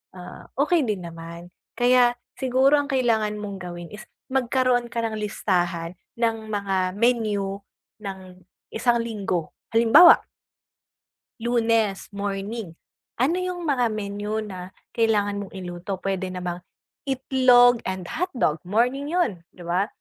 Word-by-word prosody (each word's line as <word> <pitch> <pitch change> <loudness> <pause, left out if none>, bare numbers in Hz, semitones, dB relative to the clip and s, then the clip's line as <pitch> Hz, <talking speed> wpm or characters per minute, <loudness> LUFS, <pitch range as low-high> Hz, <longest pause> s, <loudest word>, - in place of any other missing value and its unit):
ah, 180 -1 -10
okey 295 0 +2
din 200 -4 -2
naman. 170 +1 -9 0.2
Kaya 245 0 +4 0.2
siguro 265 +3 +4
ang 285 - -2
kailangan 230 -6 +1
mong 205 -2 -6
gawin 175 -1 -8
is 210 0 -10 0.2
magkaroon 255 -1 +1
ka 235 -1 -3
ng 220 -1 -2
listahan 175 -5 -1 0.2
ng 225 -2 -1
mga 195 -3 -1
menu 210 -4 +1 0.4
ng 190 -3 -8 0.3
isang 235 +1 +1
linggo. 195 -8 -3 0.2
Halimbawa 235 +10 +8 1.2
Lunes, 230 -3 +1
morning. 200 -1 -4 0.5
Ano 320 +8 +2
'yong 365 -1 -3
mga 265 -6 +2
menu 210 +1 -3
na 185 -2 -8 0.2
kailangan 205 -3 +1
mong - - -15
iluto? 180 +1 -5
Puwede 190 -1 -2
namang 180 -1 -4 0.5
itlog 255 -2 +5
and 185 -2 -4
hotdog, 265 - -1
morning 250 +7 +1
'yon, 215 - 0
'di 180 - -11
ba? 180 +4 0
215 Hz, 125 wpm, -24 LUFS, 190-245 Hz, 1.2 s, Halimbawa